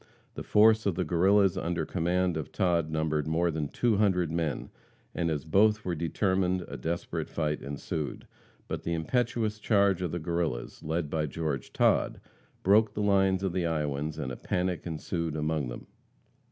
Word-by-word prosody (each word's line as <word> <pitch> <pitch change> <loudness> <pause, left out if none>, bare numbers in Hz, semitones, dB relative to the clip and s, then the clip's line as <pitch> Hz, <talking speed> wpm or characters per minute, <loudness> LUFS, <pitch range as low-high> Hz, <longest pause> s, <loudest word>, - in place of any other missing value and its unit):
The - - -6
force 110 0 +4
of 95 - +1
the 90 - 0
Guerrillas 95 +3 +3
under 85 0 -1
command 90 0 0
of 80 -1 -4
Todd 85 -5 +1
numbered 80 -1 -1
more 85 +2 +1
than 75 -2 -2
two 115 - +1
hundred 90 -6 +2
men, 80 -5 -2 0.4
and 85 - -1
as 75 -2 -2
both 105 +6 +3
were 90 - -1
determined, 90 +2 0
a - - -7
desperate 85 +7 -3
fight 75 -2 -2
ensued. 70 +2 -4 0.4
But - - -4
the 85 - -2
impetuous 110 +4 0
charge 100 -4 +3
of 90 -3 -2
the 85 - -2
Guerrillas, 85 -6 -3
led 80 -1 -2
by 75 -1 0
George 75 -3 -3
Todd, - - +2 0.4
broke 105 +2 +4
the 105 - -1
lines 95 -2 +3
of 95 -3 -1
the 90 -2 0
Iowans, 75 -1 -2
and 65 - -3
a - - -4
panic 90 -1 -2
ensued 80 0 -3
among 75 -2 -1
them. - - -7
85 Hz, 170 wpm, -29 LUFS, 80-95 Hz, 0.4 s, force